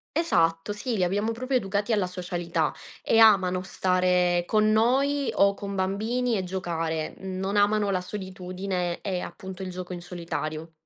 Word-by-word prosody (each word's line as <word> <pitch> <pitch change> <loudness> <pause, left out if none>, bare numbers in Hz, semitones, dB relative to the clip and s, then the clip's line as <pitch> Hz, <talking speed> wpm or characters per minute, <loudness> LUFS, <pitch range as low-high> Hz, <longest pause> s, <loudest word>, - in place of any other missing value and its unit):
Esatto, 165 - +1
sì. 225 +2 -3
Li 185 - +2
abbiamo 205 +5 0
proprio 255 +4 -2
educati 205 0 -1
alla 205 -3 +2
socialità, 175 -3 -2 0.3
e 225 - +3
amano 190 -5 +5
stare 180 -1 +2
con 215 +2 +3
noi 265 +6 +2
o 200 0 +4
con 200 0 -6
bambini, 220 +6 0
e 190 - -1
giocare. 165 -4 -3
Non 190 +1 -3
amano 205 0 +3
la 185 -1 0
solitudine 185 -2 -4
e 185 -3 -3
appunto 190 0 -7
il 185 - -4
gioco 180 0 -6
in 175 - -6
solitario. 165 -2 -5
190 Hz, 155 wpm, -26 LUFS, 180-210 Hz, 0.3 s, amano